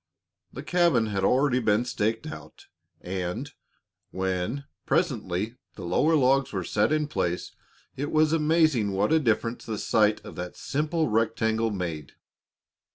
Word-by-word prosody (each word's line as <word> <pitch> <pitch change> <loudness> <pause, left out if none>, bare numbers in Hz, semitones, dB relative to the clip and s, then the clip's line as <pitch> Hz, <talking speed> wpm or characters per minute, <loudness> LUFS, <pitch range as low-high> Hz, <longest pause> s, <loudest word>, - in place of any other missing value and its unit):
The 135 - -8
cabin 170 -9 +3
had 100 -3 -2
already 130 +3 +3
been 110 0 +2
staked 115 +1 -1
out, 155 - -10 0.4
and 90 -1 -4 0.6
when, 95 +8 -2 0.2
presently, 115 - -1 0.2
the - - -7
lower 155 - +2
logs 135 -1 +3
were 95 -3 -2
set 105 - +1
in 155 -1 +1
place 90 - -2 0.4
it 145 +3 -3
was 155 0 +3
amazing 155 -9 +2
what 100 +8 +1
a 160 - +5
difference 115 -3 0
the 110 -2 -3
sight 105 -1 +2
of - - -9
that 90 0 -6
simple 155 +3 -1
rectangle 110 0 +1
made. 85 -7 -4
115 Hz, 140 wpm, -26 LUFS, 100-150 Hz, 0.6 s, a